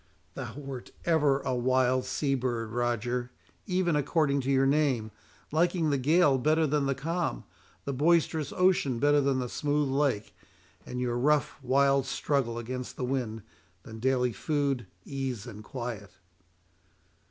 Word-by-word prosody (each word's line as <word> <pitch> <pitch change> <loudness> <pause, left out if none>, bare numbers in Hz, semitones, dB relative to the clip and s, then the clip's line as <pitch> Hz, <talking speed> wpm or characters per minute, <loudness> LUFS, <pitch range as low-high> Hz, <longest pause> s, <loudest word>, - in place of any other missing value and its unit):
"Thou 120 -2 -6
wert 135 -3 -7 0.2
ever 145 -5 +3
a - - -2
wild 130 +1 +2
sea 135 +2 -1
bird, 120 -4 -2
Roger, 120 +1 -1 0.4
even 180 -4 +1
according 145 -1 +1
to 130 - -3
your 135 0 +3
name; 135 -6 +1 0.4
liking 165 0 +2
the 140 - +1
gale 145 0 +4
better 155 +4 +3
than 145 -1 +1
the 135 - 0
calm, 160 - -2 0.4
the 140 - -2
boisterous 155 +1 +2
ocean 180 -9 +2
better 145 +3 +4
than 135 -1 +1
the 125 -1 -2
smooth 145 +2 0
lake, 135 -6 0 0.5
and 125 - -4
your 120 -1 -1
rough, 150 +2 +1
wild 135 +1 +3
struggle 130 -4 -1
against 125 +2 -5
the 125 - -2
wind, 120 -5 -2 0.4
than 110 -1 -10
daily 125 0 +1
food, 140 -7 -1 0.2
ease 135 -6 -4
and 105 +1 -9
quiet." 120 -5 -6
135 Hz, 145 wpm, -29 LUFS, 125-145 Hz, 0.5 s, gale